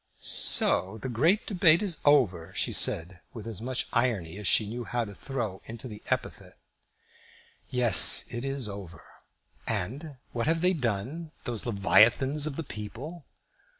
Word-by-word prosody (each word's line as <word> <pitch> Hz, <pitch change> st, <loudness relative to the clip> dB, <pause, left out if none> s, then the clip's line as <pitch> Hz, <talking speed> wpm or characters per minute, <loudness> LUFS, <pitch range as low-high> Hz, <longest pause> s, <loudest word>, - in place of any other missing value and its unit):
"So 95 Hz, +4 st, +3 dB
the 130 Hz, -, -3 dB
great 160 Hz, -, +2 dB
debate 175 Hz, -2 st, +4 dB
is 180 Hz, -6 st, -2 dB
over," 110 Hz, -, +3 dB
she -, -, -1 dB
said, 90 Hz, +3 st, -1 dB, 0.2 s
with 110 Hz, -2 st, -8 dB
as 110 Hz, -3 st, -4 dB
much 130 Hz, +2 st, -2 dB
of -, -, -18 dB
irony 105 Hz, -8 st, 0 dB
as 105 Hz, -, -3 dB
she 110 Hz, -, +4 dB
knew 120 Hz, +3 st, -5 dB
how 120 Hz, 0 st, -2 dB
to 100 Hz, -, -10 dB
throw 110 Hz, -5 st, -5 dB
into 115 Hz, +2 st, -7 dB
the 105 Hz, -3 st, -10 dB
epithet. -, -, -3 dB, 1.1 s
"Yes; 120 Hz, -5 st, +4 dB
it 120 Hz, +1 st, -4 dB
is 135 Hz, -3 st, -2 dB
over." 100 Hz, -4 st, -9 dB, 0.6 s
"And 140 Hz, -, -3 dB, 0.2 s
what 120 Hz, +2 st, -2 dB
have 165 Hz, 0 st, +1 dB
they 180 Hz, +1 st, +3 dB
done, 135 Hz, -, -3 dB
those 120 Hz, -1 st, -1 dB
leviathans 120 Hz, +8 st, +3 dB
of 145 Hz, -, -4 dB
the 165 Hz, -, -4 dB
people?" 135 Hz, -, -8 dB
120 Hz, 155 wpm, -28 LUFS, 105-145 Hz, 1.1 s, debate